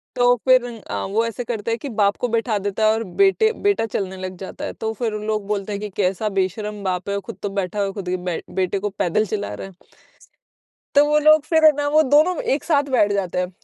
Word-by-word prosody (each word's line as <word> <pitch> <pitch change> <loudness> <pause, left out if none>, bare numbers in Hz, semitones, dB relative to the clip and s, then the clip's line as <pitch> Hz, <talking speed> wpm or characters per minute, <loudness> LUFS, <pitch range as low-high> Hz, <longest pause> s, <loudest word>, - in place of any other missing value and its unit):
तो 245 0 +4
फिर 255 -1 +5 0.3
अ, 100 -1 -2
वो 220 +4 0
ऐसे 230 +2 -4
करता 230 -2 -3
है 230 - 0
कि 280 - -7
बाप 205 -3 +2
को 245 - -1
बैठा 230 -1 0
देता 200 +2 -1
है 215 - +5
और 225 +1 -2 0.2
बेटे 415 +3 +4 0.2
बेटा 400 - +2
चलने 190 -3 -4
लग 185 0 -6
जाता 190 - -7
है, - - -5
तो 220 - -3
फिर 225 0 -2
लोग 215 -1 -2
बोलते 205 -1 -2
हैं 200 - -4
कि 210 - -4
कैसा 195 +3 0
बेशर्म 205 +2 -3
बाप 185 0 -2
है, 200 0 -1
खुद 230 +3 -9
तो 205 - -2
बैठा 195 0 -3
हुआ 200 - +1
है 195 - -5
खुद 190 -3 -6
के 185 - 0
बे 180 -2 -4
बेटे 190 +1 0
को 205 +2 -2
पैदल 195 +1 0
चला 205 0 -4
रहा - - -7
है। 190 - -16 1.2
तो 285 +1 +7
वो 300 0 +3
लोग 310 0 +5
फिर 320 0 +2
ना 290 0 -1
वो 305 +2 +5
दोनों 305 +6 +4 0.2
एक 285 - -4
साथ 290 -4 +3
बैठ 210 -5 +3
जाते 190 -3 -2
हैं। 180 0 -1
210 Hz, 245 wpm, -21 LUFS, 195-245 Hz, 1.2 s, तो